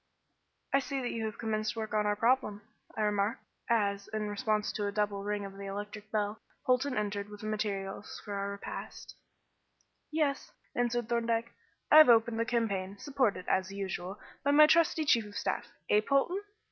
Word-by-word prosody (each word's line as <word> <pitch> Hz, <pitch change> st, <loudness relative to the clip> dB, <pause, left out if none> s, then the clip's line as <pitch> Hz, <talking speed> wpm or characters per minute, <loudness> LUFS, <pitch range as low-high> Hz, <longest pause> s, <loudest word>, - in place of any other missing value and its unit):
"I 275 Hz, -, +6 dB
see 275 Hz, 0 st, -3 dB
you 235 Hz, -3 st, -2 dB
have 215 Hz, -, -4 dB
commenced 220 Hz, 0 st, -1 dB
work 220 Hz, -1 st, -4 dB
on 210 Hz, -1 st, +2 dB
our 205 Hz, -, +2 dB
problem," 225 Hz, -2 st, +1 dB, 0.3 s
I -, -, 0 dB
remarked 210 Hz, +3 st, 0 dB, 0.3 s
as, 200 Hz, -3 st, +1 dB
in 215 Hz, -1 st, -3 dB
response 210 Hz, +1 st, 0 dB
to 205 Hz, -1 st, -2 dB
a -, -, -1 dB
double 205 Hz, -1 st, 0 dB
ring 205 Hz, 0 st, -2 dB
of 195 Hz, -, -8 dB
the 200 Hz, 0 st, -7 dB
electric 205 Hz, +1 st, -6 dB
bell, 210 Hz, 0 st, -1 dB, 0.2 s
Polton 255 Hz, +1 st, +2 dB
entered 205 Hz, -1 st, -2 dB
with 210 Hz, 0 st, -10 dB
the -, -, -7 dB
materials 205 Hz, -2 st, -3 dB
for 205 Hz, -, -5 dB
our 200 Hz, 0 st, -2 dB
repast. 200 Hz, 0 st, -7 dB, 1.0 s
"Yes," 300 Hz, -3 st, 0 dB, 0.2 s
answered 240 Hz, -1 st, 0 dB
Thorndyke. 230 Hz, -1 st, 0 dB, 0.4 s
"I 310 Hz, -, +10 dB
have 310 Hz, -, +9 dB
opened 225 Hz, -1 st, +5 dB
the 230 Hz, -, +2 dB
campaign, 200 Hz, -5 st, -1 dB
supported, 245 Hz, -7 st, 0 dB
as 190 Hz, 0 st, +1 dB
usual, 195 Hz, -1 st, -4 dB, 0.2 s
by 285 Hz, -, +1 dB
my 300 Hz, +2 st, +8 dB
trusty 320 Hz, 0 st, +3 dB
chief 235 Hz, -5 st, +4 dB
of 205 Hz, -, -12 dB
staff; -, -, -2 dB, 0.2 s
eh! 210 Hz, -, +4 dB
Polton?" 275 Hz, -, +1 dB
215 Hz, 175 wpm, -31 LUFS, 205-240 Hz, 1.0 s, I